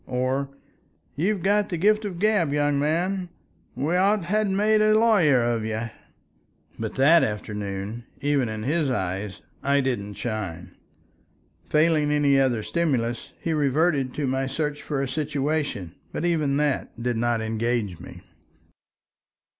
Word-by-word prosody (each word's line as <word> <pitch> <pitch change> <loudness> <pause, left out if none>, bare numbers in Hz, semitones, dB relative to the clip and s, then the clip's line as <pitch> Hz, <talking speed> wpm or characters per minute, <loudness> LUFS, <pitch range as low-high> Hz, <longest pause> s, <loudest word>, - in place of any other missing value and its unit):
Or, 130 +2 -1 0.7
"You've 190 +5 0
got 205 +1 +2
the 175 - -2
gift 210 +4 +3
of 200 - -3
the - - -9
gab, 205 -8 +2
young 145 -1 +1
man. 175 +5 0 0.5
We 145 +7 0
ought 195 +3 +4
to 195 -6 -5
ha' 210 +4 +1
made 210 +2 +3
a 215 0 +5
lawyer 185 - +4
of 120 -2 0
you." 110 +1 -3 0.9
But 110 -1 -4
that 155 +5 +5
afternoon, 105 +1 -4
even 140 -4 +1
in 110 0 -5
his 150 +3 +1
eyes, 95 -4 -3 0.2
I 140 +1 +2
didn't 115 -7 -2
shine. 105 -8 -5 0.9
Failing 155 -1 +3
any 145 -2 +3
other 125 -5 +1
stimulus, 125 -9 -1
he 165 - -2
reverted 145 -2 +1
to 150 - -1
my 130 0 0
search 150 +2 -3
for 140 -2 -2
a - - -2
situation, 145 - -2 0.2
but 170 - -3
even 155 -5 +1
that 145 -5 -1
did 120 -1 0
not 120 0 +1
engage 110 -4 -1
me. - - -11
140 Hz, 145 wpm, -25 LUFS, 115-165 Hz, 0.9 s, a